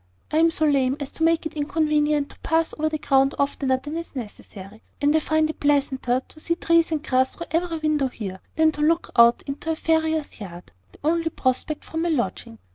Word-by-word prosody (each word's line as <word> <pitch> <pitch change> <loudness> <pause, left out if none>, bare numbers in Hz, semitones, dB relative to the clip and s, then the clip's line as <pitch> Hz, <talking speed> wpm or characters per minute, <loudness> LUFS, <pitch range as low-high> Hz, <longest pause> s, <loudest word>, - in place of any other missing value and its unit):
I 310 - +1
am 330 +1 +5
so 315 -1 0
lame 275 -2 +2
as 280 -2 -5
to 320 - -4
make 330 0 +2
it 315 - -4
inconvenient 300 -1 +1
to - - -16
pass 325 0 0
over 310 0 0
the 310 - -2
ground 270 -1 +2
oftener 275 -2 0
than 290 +4 -7
is 335 -2 -6
necessary; 210 -3 -9 0.2
and 290 +1 +2
I - - +5
find 315 0 +1
it 315 - -6
pleasanter 270 -3 +1
to 310 - -16
see 335 +2 -1
trees 335 -1 +2
and 310 -1 -1
grass 260 -3 +1
through 340 - -6
every 330 0 0
window 305 -3 +1
here, 195 -7 -7 0.2
than 315 0 +4
to 300 - -6
look 330 +3 +1
out 235 0 +6
into 280 +3 -5
the 320 - +1
farrier's 320 -3 0
yard, 180 -4 -10 0.2
the - - -18
only 330 +2 +1
prospect 270 +1 -2
from 320 - -4
my 340 - 0
lodging. 195 - -2
300 Hz, 215 wpm, -23 LUFS, 265-320 Hz, 0.2 s, out